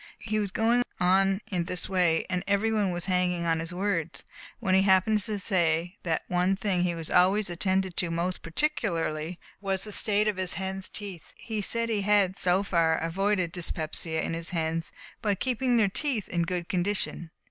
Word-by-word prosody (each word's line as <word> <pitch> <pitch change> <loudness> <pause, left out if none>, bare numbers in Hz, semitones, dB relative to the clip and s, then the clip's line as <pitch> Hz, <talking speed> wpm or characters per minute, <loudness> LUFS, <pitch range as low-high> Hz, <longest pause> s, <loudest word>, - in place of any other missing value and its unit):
He 215 -1 -2
was 205 -2 -1
going 230 +5 +2 0.2
on 190 +2 +3
in 175 -3 0
this 180 +1 -1
way, 175 -4 +2
and 180 -1 -1
every 200 +2 +2
one 210 -3 +1
was 175 -1 -3
hanging 180 -2 +1
on 165 -1 +1
his 165 +1 -4
words, 180 -3 -2 0.4
when 190 - 0
he 190 - +6
happened 195 +2 +4
to 210 +1 -2
say 175 -1 0
that 165 -2 -1
one 180 +2 +2
thing 190 -3 0
he 170 -3 -2
always 190 +2 +3
attended 190 +1 0
to 175 - 0
most 170 +2 -2
particularly 165 - -1 0.2
was 195 -1 -1
the 210 - -4
state 210 +1 +2
of 210 -3 0
his 185 -2 -1
hens' 190 0 -3
teeth. 195 -6 -8
He 220 -2 -4
said 230 +3 +1
he 215 -3 0
had, 200 -2 +3
so 185 +1 +2
far, 165 -4 +2
avoided 185 +1 0
dyspepsia 160 -2 -1
in - - -2
his 165 0 -2
hens, 165 -1 -2 0.3
by 205 -2 +1
keeping 250 +2 0
their 220 -3 +4
teeth 235 +1 -1
in 170 -1 0
good 175 -2 -2
condition. 180 -2 -2
185 Hz, 185 wpm, -28 LUFS, 170-205 Hz, 0.4 s, he